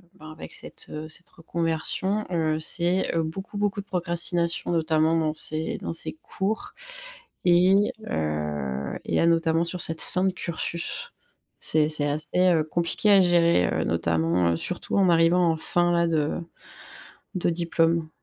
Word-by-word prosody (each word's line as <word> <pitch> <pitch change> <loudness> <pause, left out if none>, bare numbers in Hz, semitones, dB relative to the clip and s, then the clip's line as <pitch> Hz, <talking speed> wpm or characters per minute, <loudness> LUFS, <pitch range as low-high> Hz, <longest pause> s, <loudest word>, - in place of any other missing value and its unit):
ben 155 -4 -12
avec 155 - -10
cette, - - -7
heu, 155 +1 -6
cette 175 +3 -8
reconversion, 170 +5 -1
heu, 160 -2 0
c'est, 175 +3 0
heu, 165 - +2
beaucoup, 190 +6 -6
beaucoup 205 0 -1
de - - -18
procrastination, 170 -2 -1
notamment 160 -1 +2
dans 155 -1 0
ces 155 +1 0
dans - - -5
ces 165 - -3
cours 200 +3 -3 0.7
et 185 +4 +4 0.2
heu, 75 -3 -3
et - - 0
à 165 - +3
notamment 165 0 +2
sur 175 +1 -1
cette 160 0 +2
fin 185 - 0
de 190 - +1
cursus. 170 - -1 0.5
C'est 155 -1 +1
c'est 150 -2 -2
assez, 150 +2 0
heu, 180 -3 +4
compliqué 170 +6 0
à 200 -1 +7
gérer, 170 - +3
heu, - - 0
notamment, 85 +1 +1
heu, - - 0
surtout 180 - -1
en 195 -2 +4
arrivant 170 +1 +4
en 160 - -2
fin 175 +2 +2
là, 170 0 +2
de 155 -3 0 1.0
de 180 - 0
diplôme. 165 -1 0
165 Hz, 160 wpm, -25 LUFS, 155-175 Hz, 1.0 s, à